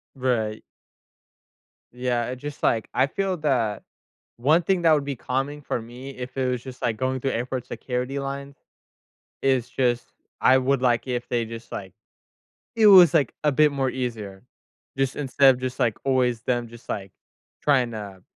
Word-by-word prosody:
Right. 115 -5 -1 1.3
Yeah, 125 -1 -1
it 125 0 -5
just 145 +2 -8
like 115 -2 +1
I 135 - +3
feel 190 +4 -2
that 125 -9 0 0.5
one 155 +8 +4
thing 190 -1 +1
that 160 -1 +6
would 145 -2 +2
be 140 -2 -3
calming 135 +4 -3
for 120 - -3
me 125 +4 -9
if 125 +1 -7
it 130 -1 +1
was 125 -1 -2
just, 130 -1 -10
like, 110 -2 0
going 130 +1 -1
through 135 - -1
airport 125 +1 -3
security 125 +2 -3
line 140 0 -5 0.9
is 130 -2 +1
just, 125 -2 +1 0.4
I 130 +1 +6
would 130 0 +1
like 120 0 +2
if 120 -1 -3
they 120 -2 0
just, 115 0 -9
like 95 -2 -6 0.8
it 220 -1 +5
was, 180 -5 +9
like, 140 -7 +3
a 150 - +4
bit 150 +2 +4
more 135 -2 0
easier. 110 -7 -5 0.6
Just 135 -1 +1
instead 135 -1 +4
of 125 - -10
just, 130 0 -4
like, 115 -3 +1
always 125 -3 +1
them 120 -2 -1
just, 120 0 -15
like, 95 -2 -4 0.5
trying 130 -5 +2
to 100 -4 -8
130 Hz, 175 wpm, -24 LUFS, 120-135 Hz, 1.3 s, was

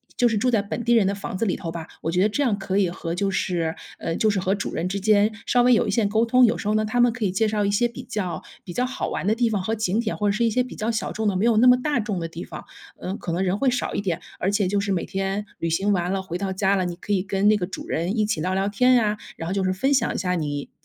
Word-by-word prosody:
就 245 - +3
是 225 - 0
住 250 +5 +2
在 225 -4 +2
本 205 +3 -4
地 240 0 +3
人 220 - +4
的 195 - +1
房 200 -2 -5
子 225 - 0
里 190 - 0
头 165 -3 -5
吧， 165 -1 -6 0.2
我 165 - -2
觉 180 +3 +2
得 215 - +3
这 255 - -1
样 235 -8 +2
可 195 0 -1
以 185 -3 +2
和 170 -1 -5
就 195 +3 0
是 170 -4 -1 0.2
呃， 165 - -2
就 215 -1 +2
是 195 - 0
和 190 +2 +1
主 200 - -4
人 175 +3 -2
之 200 +1 -2
间 210 +1 +3
稍 245 - +3
微 245 0 +5
有 - - +1
一 - - 0
些 225 -4 +2
沟 220 +3 +2
通。 250 +2 +4
有 230 0 +4
时 205 - -5
候 210 - +2
呢， 215 - +2
他 245 +3 -1
们 240 -1 +4
可 245 -2 -5
以 190 - +1
介 220 +4 +1
绍 210 -1 0
一 - - +1
些 205 +4 +2
比 240 +2 -9
较 210 -7 -3 0.2
比 175 - -8
较 250 - 0
好 260 - -3
玩 - - -3
的 220 - +3
地 240 0 +2
方 205 - 0
和 220 +5 -1
景 215 -1 0
点， 220 -2 -2
或 210 - 0
者 200 - +3
是 235 - +1
一 230 - +3
些 250 +3 +1
比 250 - -9
较 215 +2 -2
小 225 -2 -2
众 220 0 -2
的， 200 - +1
没 210 - +1
有 230 -2 +3
那 250 +3 +6
么 250 - +7
大 290 -2 0
众 210 -4 -2
的 165 - -3
地 165 +1 -7
方， - - -9 0.3
呃， 190 +2 -4
可 170 - -5
能 180 +3 0
人 190 +2 0
会 275 - +3
少 250 - -1
一 - - -1
点。 180 -4 -2 0.2
而 190 - +1
且 200 -2 +1
就 205 +2 +1
是 200 0 -1
每 180 -3 0
天 195 +1 -2
旅 165 - -1
行 195 +5 +1
完 180 0 0
了， 195 -1 -1
回 175 -1 -5
到 195 -1 -2
家 195 +1 +1
了， 185 -2 0
你 175 -1 -3
可 205 +4 -3
以 190 - +2
跟 195 +1 0
那 215 - +6
个 180 -3 -2
主 - - -7
人 175 +7 -2
一 215 - +3
起 205 -7 -1
聊 185 +3 -1
聊 195 +1 +1
天 250 +5 +4
呀， 215 -3 +2 0.2
然 165 - -6
后 185 - -2
就 195 -1 0
是 185 - +1
分 265 +10 +1
享 245 -3 +2
一 - - -1
下 180 -1 -1
你 145 -4 -3
200 Hz, 365 characters per minute, -24 LUFS, 185-225 Hz, 0.3 s, 么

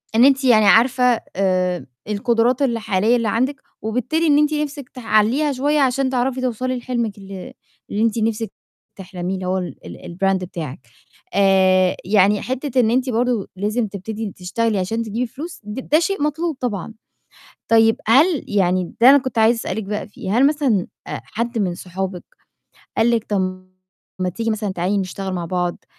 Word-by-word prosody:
إن 240 +3 +7
أنتِ 270 0 +4
يعني 220 -5 +5
عارفة 245 +3 +4
آآ، 185 -2 0 0.2
القدرات 235 +5 +1
الحالية 230 -3 +1
اللي 230 -2 0
عندِك 260 +6 0 0.2
وبالتالي 250 +9 0
إن 290 -1 +5
أنتِ 300 +1 +3
نِفْسِك 290 -3 -3
تحلّيها 240 +5 +1
شوية 290 +3 +1
عشان 265 0 +2
تعرفي 255 0 -1
توصلي 255 +1 -2
لحلمِك 235 -4 -3
ال 195 -2 -9 0.4
اللي 210 - -1
أنتِ 230 0 +1
نِفْسِك 225 0 -1 0.4
تحلميه 185 -1 -5
اللي 185 -1 -5
هو 190 +1 0
ال 180 -1 -4 0.4
الbrand 195 0 +2
بتاعك. 170 -7 -6 0.5
آآ، 190 -1 +4
يعني 205 +1 +3
حتّة 260 0 -2
إن 225 -2 +3
أنتِ 255 +1 +1
برضه 240 -3 0
لازم 215 +4 -1
تبتدي 210 +1 -5
تشتغلي 205 +3 -1
عشان 225 +5 -1
تجيبي 230 +3 -3
فلوس 315 +6 -8
ده 265 +9 0
شيء 345 -1 -1
مطلوب 310 0 -1
طبعًا. 220 -3 -3 0.7
طيب 225 0 +4
هل 290 +6 +4
يعني 185 -3 0
ده 250 - +9
أنا 285 - +8
كنت 260 -3 -4
عايزة 225 +2 +5
أسألِك 220 -1 -3
بقى 210 +2 -4
فيه، 205 +1 -3
هل 275 +2 +6
مثلًا 275 - +1 0.2
حد 230 +1 -4
من 180 -3 0
صحابِك 185 0 -5 0.8
قال 230 +2 +4
لكِ 230 -1 +1
طَب 185 -2 -2 0.5
ما 185 - 0
تيجي 225 +5 -2
مثلًا 215 -2 -2
تعالي 185 +3 0
نشتغل 190 0 -4
مع 175 -1 -3
بعض، 180 0 -2
225 Hz, 160 wpm, -20 LUFS, 195-255 Hz, 0.8 s, ده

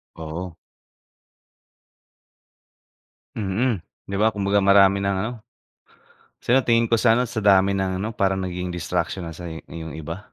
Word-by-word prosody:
Oo. 80 +3 -6 2.8
Mm, 110 +3 0 0.3
'di 100 - -3
ba 110 +2 +3
kumbaga 100 0 +1
marami 100 0 +5
ng 100 0 0
ano, - - -3 1.1
sa 130 +3 +2
tingin 115 -1 +3
ko 115 - +2
sa 115 -1 +4
ano, 125 - +1
sa 115 -2 -4
dami 100 -1 +4
ng 95 -1 -1
ano 105 - -2
parang 95 -1 0
nagiging 90 0 -4
distraction 90 +1 -3
na 80 - -7
sa 85 +1 -8
i 80 - -7
iyong 80 -1 -8
iba. 80 +3 -6
95 Hz, 145 wpm, -23 LUFS, 90-110 Hz, 2.8 s, marami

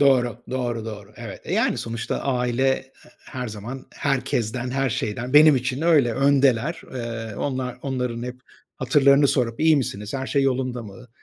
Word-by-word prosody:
Doğru, 125 -4 +3
doğru, 120 -3 -2
doğru. 105 -2 -8
Evet, 115 -5 -8
e, - - -5
yani - - +1
sonuçta 115 0 -3
aile, 125 0 +1
ııı, - - -8 0.4
her 125 -3 -5
zaman, 115 +5 -7
herkesten, 125 -3 -1
her 135 -1 0
şeyden, 120 +5 -3
benim 150 -1 +8
için 125 +3 -2
öyle, 150 -8 +4
öndeler. 140 +2 +2
Iıı, 115 -3 -5
onlar 130 -3 -3
onların 125 -3 -2
hep 125 0 -6 0.4
hatırlarını 140 +1 +4
sorup 115 -3 0
iyi 160 -1 +5
misiniz? 105 -4 -3
Her 135 -1 -3
şey 140 -1 +1
yolunda 130 -2 -1
mı? 115 +3 -12
125 Hz, 160 wpm, -23 LUFS, 115-135 Hz, 0.4 s, benim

